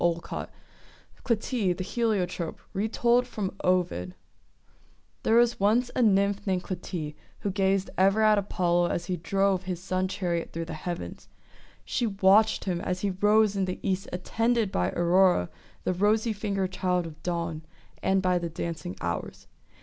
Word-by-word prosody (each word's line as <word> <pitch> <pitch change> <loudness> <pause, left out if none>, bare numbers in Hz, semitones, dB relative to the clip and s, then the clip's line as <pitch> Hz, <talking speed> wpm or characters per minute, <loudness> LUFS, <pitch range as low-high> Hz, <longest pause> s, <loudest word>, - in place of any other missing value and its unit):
^ 170 -1 -1 0.8
CLYTIE, 225 -4 0
THE 185 - -5
HELIOTROPE 185 -6 -1
Retold 235 +4 +2
from 205 -5 -4
Ovid 175 - 0 1.1
THERE 225 - +2
was 240 0 +4
once 225 +5 +2
a - - +2
Nymph 200 -2 +2
named 185 -1 0
Clytie, 175 -4 -5 0.3
who 205 - -1
gazed 195 0 +1
ever 195 +3 +4
at 215 -1 +5
Apollo 175 -3 +1
as 175 - -2
he 180 - -1
drove 195 +1 +1
his 180 -2 -3
sun 185 0 -1
chariot 180 -3 -2
through 165 0 -4
the 165 - -6
heavens. 175 +2 -6 0.6
She 240 - 0
watched 200 +2 +4
him 175 -3 -2
as 180 0 -2
he 200 - 0
rose 210 +2 +3
in 195 -1 +1
the 185 0 -4
east 190 +1 -1
attended 225 +4 0
by 90 - +1
Aurora, 175 - +3 0.3
the - - 0
rosy 215 +4 +2
fingered 195 -2 -2
child 180 -2 0
of 160 -2 -10
Dawn, 170 -3 -3 0.4
and 190 0 +2
by 180 -1 +2
the 170 -1 -3
dancing 165 - -5
Hours. 85 0 -4
190 Hz, 155 wpm, -27 LUFS, 175-210 Hz, 1.1 s, at